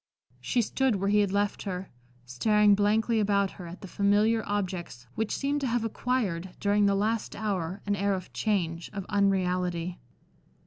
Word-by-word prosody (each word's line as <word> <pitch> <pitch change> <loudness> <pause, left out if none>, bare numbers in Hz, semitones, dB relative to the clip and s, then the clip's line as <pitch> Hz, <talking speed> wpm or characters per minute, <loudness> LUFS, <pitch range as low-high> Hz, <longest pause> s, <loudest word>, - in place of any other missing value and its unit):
She 245 -2 +1
stood 265 +1 +1
where 195 +1 0
he 210 +1 +4
had 200 -2 +2
left 205 0 0
her, 185 -2 -5 0.3
staring 210 - +3
blankly 215 +3 +2
about 200 -2 +2
her 180 -3 -9
at 170 +2 -10
the - - -8
familiar 205 +4 +2
objects 185 -10 -3
which 220 -1 -2
seemed 285 +1 -1
to 270 - 0
have 240 -1 0
acquired, 205 -7 -2
during 205 0 +3
the 200 - +3
last 215 +2 -1
hour, 195 -3 -3
an 205 0 +1
air 200 0 +1
of 185 -1 -8
change, 170 -6 -1
of 195 -2 -5
unreality. 180 -3 0
200 Hz, 170 wpm, -28 LUFS, 185-215 Hz, 0.3 s, he